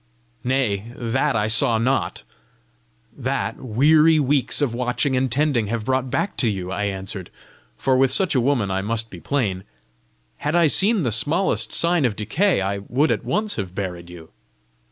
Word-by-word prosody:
"Nay; 120 -5 -1
that 130 +4 -1
I 105 -1 +1
saw 110 +1 +2
not! 130 +4 -1 0.9
That, 135 +1 -3
weary 150 +7 +4
weeks 140 -2 +1
of 140 -6 0
watching 125 +3 -1
and 130 -1 0
tending 135 -4 +1
have 110 0 -3
brought 130 0 0
back 200 - -2
to 120 - +1
you," 95 -3 -4
I 105 +2 -2
answered 95 -2 -4 0.5
for 130 +1 +1
with 130 0 +3
such 185 +6 +3
a 130 - +2
woman 120 -6 0
I 95 0 -1
must 115 +2 -3
be 90 - -9
plain! 100 -7 -2 0.7
"Had 150 +3 -2
I 170 -1 +4
seen 195 +6 +4
the 120 - 0
smallest 115 - +1
sign 170 -2 +2
of 115 -4 0
decay, 125 - 0
I 100 +1 -2
would 130 +10 0
at - - -1
once 215 0 -1
have 95 -4 -5
buried 90 -3 -5
you." 85 -2 -12
125 Hz, 175 wpm, -22 LUFS, 105-145 Hz, 0.9 s, weary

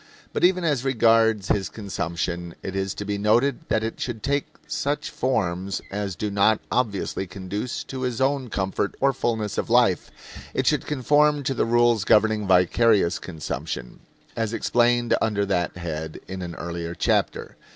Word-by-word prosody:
But - - -2
even 180 0 +4
as 145 -7 +1
regards 115 -5 +3
his 100 -2 +1
consumption 85 -4 -4
it 95 - -5
is 95 0 -2
to 105 - -5
be 100 0 -2
noted 120 +6 +3
that 110 0 +1
it 115 - -4
should 115 -4 -4
take 140 +1 0 0.2
such 145 +1 -2
forms 95 -7 -1
as 100 -2 -3
do 105 +4 -3
not 100 +2 +3
obviously 100 -5 -1
conduce 100 +5 -4
to 130 -1 -6
his 125 -2 -2
own 135 -1 +1
comfort 95 0 -2
or 135 0 +3
fullness 110 -5 -1
of - - -3
life; 115 -7 +3 0.5
it - - 0
should - - +1
conform 150 +1 +3
to 135 - 0
the 125 - +1
rules 120 -2 +3
governing 105 0 +3
vicarious 95 +1 +3
consumption, 75 -6 -5 0.4
as 115 -1 -1
explained 120 0 +2
under 105 -2 +1
that 90 -3 -1
head 80 -2 -5
in 95 0 -6
an 85 -2 -6
earlier 85 0 -5
chapter. - - 0
105 Hz, 160 wpm, -24 LUFS, 95-120 Hz, 0.5 s, even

